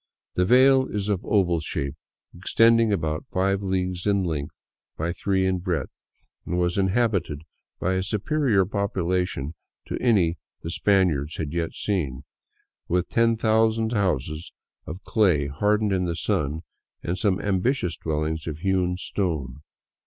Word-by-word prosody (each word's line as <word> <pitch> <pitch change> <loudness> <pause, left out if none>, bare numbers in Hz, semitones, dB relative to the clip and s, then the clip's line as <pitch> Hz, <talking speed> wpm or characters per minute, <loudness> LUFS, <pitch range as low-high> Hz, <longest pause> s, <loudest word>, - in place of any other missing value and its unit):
The 90 - +2
vale 130 +4 +5
is 105 0 -3
of 100 -3 0
oval 90 -5 +2
shape, 70 -2 -3 0.4
extending 115 +5 +4
about 80 -5 -2
five 95 +1 +1
leagues 95 -1 -2
in 100 -1 +2
length 75 -5 -3 0.4
by 85 +2 -1
three 95 0 0
in 95 -1 +1
breadth, 85 -7 -4 0.4
and 90 - -3
was 90 -1 +1
inhabited 95 -7 0 0.4
by 95 - 0
a 95 - 0
superior 105 +1 +1
popula 95 -2 0
tion 75 -4 -5 0.3
to - - -4
any 90 -9 +2 0.2
the 80 - -4
Spaniards 85 -7 +2
had 75 -2 -4
yet 85 -1 -2
seen; 75 -10 -2 0.6
with 90 0 0
ten 115 -1 +3
thousand 110 0 +2
houses 80 - -1 0.4
of 90 +4 -7
clay 90 -10 +2
hardened 105 +9 +1
in 90 -1 +1
the 85 -1 -2
sun 75 +1 -1 0.4
and 85 - -1
some 100 -4 +1
ambitious 100 -1 0
dwellings 80 0 -2
of 75 -2 -4
hewn 90 0 0
stone." 75 -9 -3
90 Hz, 145 wpm, -25 LUFS, 80-105 Hz, 0.6 s, vale